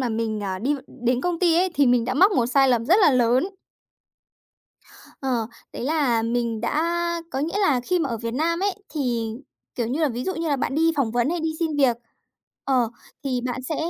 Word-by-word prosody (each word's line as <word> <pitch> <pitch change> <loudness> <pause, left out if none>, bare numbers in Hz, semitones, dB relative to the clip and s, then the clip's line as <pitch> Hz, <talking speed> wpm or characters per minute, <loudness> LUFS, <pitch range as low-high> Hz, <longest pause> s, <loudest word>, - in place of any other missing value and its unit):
mà 255 - 0
mình, 220 -1 -2
à, 190 -2 -3
đi 265 +9 0
v - - -5
đến 245 0 -1
công 350 +2 -1
ty 345 -2 +3
ấy 370 +1 +2
thì 285 -3 +4
mình 245 -1 +3
đã - - -2
mắc 385 +9 +5
một 245 -10 +2
sai 270 +2 +4
lầm 240 -2 +2
rất 365 +8 +5
là 355 - +7
lớn. 255 +7 +2 1.7
Ờ. 250 -5 -1 0.3
Đấy - - -5
là 270 -6 +1
mình 230 -1 -1
đã 320 +9 0 0.3
có 265 - -3
nghĩa 330 +7 -1
là 295 -11 +3
khi 360 +9 0
mà 325 -5 -1
ở 235 - -2
Việt 230 +1 -4
Nam 335 +5 0
ấy 400 0 0
thì, 240 -7 -2 0.4
kiểu 240 - -1
như 265 +7 -2
là 310 - +3
ví 245 0 -4
dụ 375 - -2
như 330 0 -2
là 285 - +1
bạn 270 - -2
đi 325 +2 +3
phỏng 265 -6 +1
vấn 240 +3 +1
hay 345 0 -1
đi 320 - -1
xin 320 -3 -1
việc, 265 -5 +3 0.7
ờ, 250 -4 +2 0.3
thì 255 -3 -1
bạn 255 +1 -4
sẽ, 300 +4 -2
265 Hz, 230 wpm, -23 LUFS, 240-320 Hz, 1.7 s, là